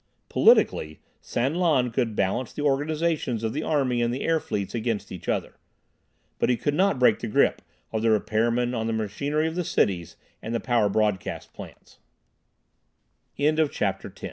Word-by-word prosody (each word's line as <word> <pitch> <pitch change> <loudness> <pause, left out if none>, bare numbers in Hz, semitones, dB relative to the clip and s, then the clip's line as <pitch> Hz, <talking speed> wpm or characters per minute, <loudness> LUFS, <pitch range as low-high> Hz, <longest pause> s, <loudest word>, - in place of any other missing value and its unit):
Politically, 75 0 +3 0.2
San 130 +5 -1
Lan 155 -9 +2
could 115 -2 -1
balance 105 +6 -1
the 145 - -4
organizations 150 -3 0
of 110 - -1
the 150 - -2
army 130 -6 0
and 120 0 +1
the 130 - -3
air 165 -1 +2
fleets 100 -8 -4
against 115 -2 -2
each 90 - -7
other, - - -2 0.8
but - - +2
he 125 - +2
could 145 +5 -1
not 190 0 +2
break 125 -4 +4
the 115 - -4
grip 105 - +2 0.3
of 110 - 0
the 115 - +2
repairmen 115 +3 +1
on 110 -2 -2
the 115 - -1
machinery 140 +9 -1
of 160 - -3
the 180 +1 -2
cities 85 - 0 0.3
and 115 +2 -4
the - - +1
power 115 -5 +1
broadcast 105 -2 -1
pla - - -9
120 Hz, 160 wpm, -25 LUFS, 110-145 Hz, 0.8 s, break